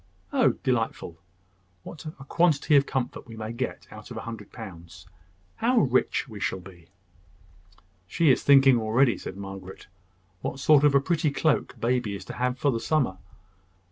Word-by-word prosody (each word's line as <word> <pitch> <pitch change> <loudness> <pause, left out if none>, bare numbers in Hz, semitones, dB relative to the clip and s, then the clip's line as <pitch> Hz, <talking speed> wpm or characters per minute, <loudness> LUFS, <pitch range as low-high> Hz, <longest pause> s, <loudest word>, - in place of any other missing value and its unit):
"Oh, 260 -4 +4
delightful! 115 - -2 0.6
What 160 -1 -10
a 155 -3 -9
quantity 155 0 +2
of 140 0 +4
comfort 130 -3 -3
we 115 - -10
may 110 0 -5
get 125 +2 -4
out 105 -1 -11
of 120 - -8
a - - -4
hundred 110 -3 -8
pounds! 85 -6 -11 0.5
How 245 +2 +1
rich 130 +2 +1
we 110 -4 -9
shall 95 - -2
be!" 90 -2 -15 1.2
"She 160 - +3
is - - +2
thinking 135 -3 +6
already," 115 +3 +2
said 95 - -8
Margaret, 95 -1 -9 0.6
"what 135 - -4
sort 145 +1 +5
of 145 -1 +4
a 140 - +5
pretty 155 0 0
cloak 150 +1 0
baby 120 -3 0
is 100 - -9
to - - -7
have 125 0 -1
for 140 - +1
the 115 - -2
summer." 125 -11 0
125 Hz, 170 wpm, -26 LUFS, 105-140 Hz, 1.2 s, thinking